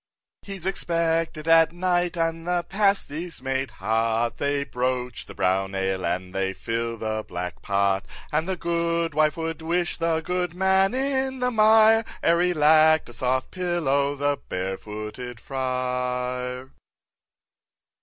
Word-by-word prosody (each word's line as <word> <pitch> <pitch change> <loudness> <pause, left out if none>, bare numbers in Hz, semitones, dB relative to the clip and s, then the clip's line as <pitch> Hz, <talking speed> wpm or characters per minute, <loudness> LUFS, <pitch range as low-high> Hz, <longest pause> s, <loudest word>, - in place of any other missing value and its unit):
6. - - -20
He's 190 -3 -5
expected 165 -3 -1
at 165 0 +6
night, 175 0 0
and 165 0 -1
the 175 -1 0
pasty's 180 -5 0
made 135 +1 -2
hot, 115 +1 0
They 140 0 0
broach 125 -2 -3
the - - -11
brown 95 +1 0
ale, 95 -1 -1
and 90 +2 -2
they 95 0 -1
fill 115 +2 -3
the 110 0 -3
black 90 0 -5
pot, 100 -1 +1 0.2
And 160 +4 0
the 190 - 0
goodwife 170 -3 0
would 165 -1 -4
wish 175 +2 -1
the 165 -1 0
goodman 190 +4 +1
in 265 0 0
the 250 0 0
mire, 220 0 +6 0.2
Ere 170 +1 +4
he 180 0 +2
lack'd 155 -1 +5
a - - -10
soft 130 +2 -1
pillow, 150 -6 0
the 145 0 0
Barefooted 105 +6 -5
Friar. 125 0 -3
150 Hz, 135 wpm, -25 LUFS, 120-175 Hz, 0.2 s, at